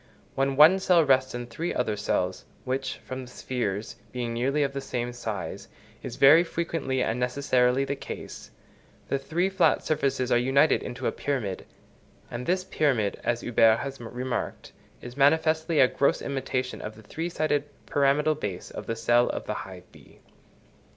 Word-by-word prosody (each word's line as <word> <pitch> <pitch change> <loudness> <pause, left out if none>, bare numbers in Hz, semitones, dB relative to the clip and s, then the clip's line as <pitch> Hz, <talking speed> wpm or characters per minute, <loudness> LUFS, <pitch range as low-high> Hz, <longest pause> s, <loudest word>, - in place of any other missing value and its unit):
When 135 0 0
one 160 +7 +7
cell 180 -4 +4
rests 130 -2 +2
on 120 0 -4
three 165 +8 -4
other 110 -4 0
cells, 90 -2 -2 0.2
which, 130 +1 -2
from 130 0 -5
the 125 - -14
spheres 110 -6 -3
being 120 -1 -3
nearly 135 +5 +1
of 140 -1 -2
the 140 - -3
same 120 -2 -3
size, 105 -8 -5 0.3
is - - -6
very 150 +5 +7
frequently 165 -6 -2
and 110 +2 -1
necessarily 125 0 +2
the 140 - -2
case, - - -8 0.6
the 140 - 0
three 170 +7 0
flat 190 -2 +2
surfaces 135 -4 0
are 120 - +5
united 135 +5 +3
into 125 +1 -6
a - - +2
pyramid; 115 -10 -3 0.6
and 120 +1 -5
this 185 +1 +1
pyramid, 130 - 0
as 120 0 0
Huber 115 -2 +4
has 135 +1 -6
remarked, 125 +2 -4 0.3
is 120 0 -8
manifestly 160 +3 +3
a 130 - +7
gross 140 - +1
imitation 130 -2 -3
of 110 - -7
the 110 - -15
three 165 +10 -4
sided 150 -3 0 0.2
pyramidal 145 +2 +2
base 100 -11 -5
of - - -8
the 115 - -2
cell 120 +2 +3
of - - -4
the - - -2
hive 95 -2 -8
bee. - - -18
130 Hz, 170 wpm, -26 LUFS, 120-145 Hz, 0.6 s, one